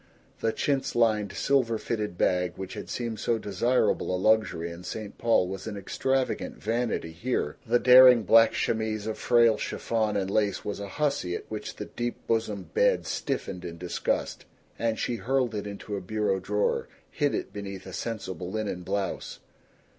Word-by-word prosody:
The 115 - +1
chintz 140 +3 -1
lined, 110 -3 +2
silver 125 -5 +2
fitted 105 -5 -3
bag 90 -1 +1
which 95 0 -6
had - - -7
seemed 115 -3 -3
so 115 - +1
desirable 110 -2 +1
a - - 0
luxury 105 -4 +2
in 85 +1 -9
St. 105 +1 -6
Paul 115 -6 +3
was 95 +2 -6
an 105 -2 -5
extravagant 130 +6 -1
vanity 115 -6 -1
here. 85 -3 -2
The 120 +2 +4
daring 125 -1 +8
black 115 +3 +6
chemise 110 -2 -1
of 110 0 -4
frail 115 -2 +4
chiffon 110 -3 -1
and 95 -1 -1
lace 100 -2 0
was 105 - -3
a 100 - -5
hussy 120 -8 -1
at - - -6
which - - -5
the - - -6
deep 120 0 -3
bosomed 105 -6 -2
bed - - +3
stiffened 90 - -3
in 85 -1 -6
disgust, 90 +1 -2 0.3
and 115 -1 0
she 120 - -1
hurled 125 -1 0
it 105 -1 -3
into 100 +1 -6
a 100 - -4
bureau 100 0 0
drawer, 105 +2 0 0.2
hid - - +1
it - - -4
beneath 100 -2 -6
a 95 - -9
sensible 95 -4 -4
linen 105 -3 -3
blouse. 95 +2 -3
110 Hz, 170 wpm, -27 LUFS, 95-115 Hz, 0.3 s, daring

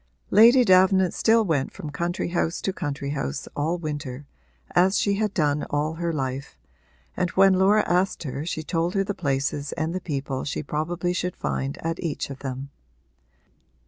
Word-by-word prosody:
Lady 235 +4 +7
Davenant 185 -1 +5
still 225 0 +3
went 145 -7 0
from 160 -7 -7
country 170 +3 -2
house 170 -1 -1
to 195 - -2
country 140 -5 -4
house 70 - -3
all 160 +4 0
winter, 145 -4 -5 0.5
as 185 +3 +3
she 200 - +2
had 215 -1 0
done 150 -5 +1
all 150 +2 0
her 170 +1 -2
life, 135 -2 -4 0.6
and 180 - 0
when 195 0 +7
Laura 195 +3 +4
asked 180 +1 +1
her 140 0 -4
she 160 -1 -3
told 170 +3 -1
her 195 - +2
the 205 - -3
places 140 -3 -2
and 160 +1 -2
the 185 - -3
people 140 -5 -3
she 145 - -3
probably 175 +5 -2
should 180 0 -2
find 70 0 -3
at 165 0 -2
each 155 -4 -3
of 135 - -8
them. 135 +1 -6
165 Hz, 175 wpm, -25 LUFS, 145-185 Hz, 0.6 s, Lady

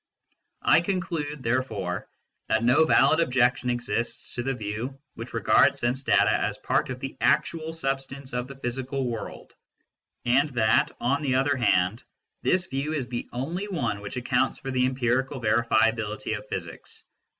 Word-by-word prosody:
I - - +5
conclude, 170 -6 -3
therefore, 115 -7 -2 0.4
that - - +2
no 125 +7 +5
valid 160 0 +4
objection 125 -4 +2
exists 120 -1 -3
to 120 - -2
the 135 +2 -1
view 115 +5 -5
which - - -8
regards - - +4
sense 125 +2 0
data - - +3
as - - -1
part - - 0
of - - -5
the - - -6
actual 160 -1 +1
substance 135 -3 -4
of 125 0 -2
the 140 - -9
physical 130 +1 -3
world, 115 -2 -6 0.7
and 135 +5 +3
that, 110 -2 +3
on 135 +5 +1
the 135 -4 0
other 140 +2 +2
hand, 110 -3 +2 0.4
this 185 0 +2
view 140 0 -3
is 135 -6 -2
the 120 -1 -4
only 165 +11 -3
one 120 - -2
which 100 +5 -6
accounts 125 +1 +1
for 135 - -6
the 125 0 +2
empirical 130 +2 0
verifiability 110 -1 +1
of 105 0 -8
physics. - - -7
130 Hz, 155 wpm, -26 LUFS, 120-140 Hz, 0.7 s, I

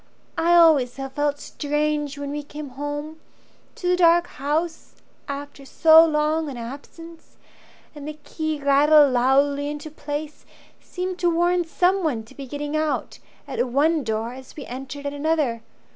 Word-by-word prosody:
I 340 +1 +3
always 310 -8 +5
have 270 0 -6
felt 290 0 0
strange 295 -1 -2
when 285 0 -5
we 295 +1 -3
came 295 0 -8
home 290 +4 -6 0.6
To 360 - -4
the 360 - +4
dark 345 -1 +5
house 315 +3 -3 0.3
after 280 0 -7
so 320 +4 +6
long 310 0 +1
an 265 - -7
absence, 290 +7 -10 0.6
And 295 -1 -9
the 305 0 -6
key 315 -2 -3
rattled 285 0 +5
loudly 280 +3 +2
into 295 +1 -6
place 295 0 -6 0.4
Seemed 365 0 -5
to 350 - +2
warn 345 +1 +2
someone 330 - +1
to 220 - -17
be 275 -1 -9
getting 290 +2 -4
out 310 -1 -2 0.3
At - - -1
one 295 +5 +2
door 225 +1 -2
as 260 0 -12
we 290 - -8
entered 270 +3 -7
at 285 - -2
another. 290 -6 0
295 Hz, 155 wpm, -23 LUFS, 280-320 Hz, 0.6 s, so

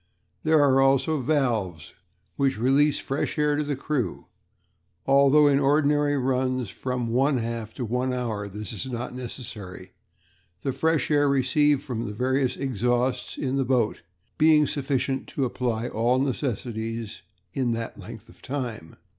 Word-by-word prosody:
There 155 0 +4
are 135 -1 +4
also 135 +3 +3
valves 115 - -1 0.4
which 135 -3 +1
release 135 +5 +3
fresh 135 +4 -3
air 150 -1 +2
to 150 - 0
the 145 -1 -2
crew, 130 - -3 0.8
although 140 +2 +5
in 140 -1 +4
ordinary 145 0 +2
runs 130 -3 0
of - - -16
from 125 -2 -3
one 135 +4 +2
half 115 -2 -4
to 125 - -3
one 125 +3 -1
hour 115 -5 -3
this 105 +1 -6
is 110 +5 -5
not 120 0 -4
necessary, 120 -6 -8 0.7
the 135 - 0
fresh 160 +3 0
air 145 -1 +4
received 140 +1 +2
from 115 -3 -4
the 105 - -5
various 130 +2 0
exhausts 125 0 -1
in 135 0 -1
the 135 - +2
boat 125 -4 0 0.4
being 155 -1 +6
sufficient 135 -2 -1
to 140 - -2
supply 120 -2 -1
all 120 +3 +1
necessities 115 -4 -3 0.3
in 125 -3 0
that 115 0 -5
length - - -10
of - - -18
time." 120 - -5
130 Hz, 150 wpm, -25 LUFS, 115-140 Hz, 0.8 s, being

